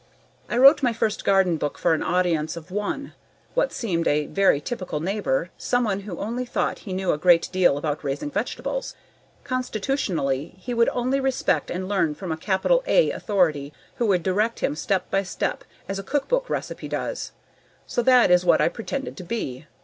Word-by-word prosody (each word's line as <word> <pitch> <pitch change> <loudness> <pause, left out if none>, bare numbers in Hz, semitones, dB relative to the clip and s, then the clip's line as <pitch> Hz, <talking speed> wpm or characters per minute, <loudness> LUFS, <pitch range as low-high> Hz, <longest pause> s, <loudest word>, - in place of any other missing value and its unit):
I 235 - -1
wrote 275 +5 +8
my 245 -3 +2
first 220 -1 -1
garden 190 -4 +3
book 145 -1 -3
for - - +2
an 160 - 0
audience 170 -3 0
of 170 +2 -10
one: 210 +8 -3 0.4
what - - +1
seemed 170 -8 -1
a 150 0 +2
very 195 -6 +3
typical 185 -3 -4
neighbor, 180 -3 -1
someone 230 -6 0
who 195 -4 -7
only 235 +5 -3
thought 245 - -2
he - - -4
knew 185 0 0
a 150 - -1
great 175 0 +5
deal 180 -6 +3
about 150 0 -3
raising 145 +1 -3
vegetables. 250 - -3 0.5
Constitutionally, 210 - -2
he 245 +6 -5
would 235 0 +3
only 255 +3 0
respect 265 -1 0
and 185 +1 -3
learn 185 -7 +1
from 185 -1 -5
a - - 0
capital 195 - +1
"A" - - +4
authority 155 -9 0 0.2
who 235 - +1
would 185 -4 +2
direct 210 +5 0
him - - 0
step 185 +3 -1
by 195 - +2
step 185 - -3 0.2
as 195 0 -3
a - - -5
cookbook 470 - -1
recipe - - -4
does. - - -4 0.5
So 240 - -1
that 250 -5 +5
is 180 0 +5
what 180 - +4
I - - +3
pretended 265 +7 -5
to 185 - -7
be. 155 - -4
195 Hz, 185 wpm, -24 LUFS, 165-240 Hz, 0.5 s, wrote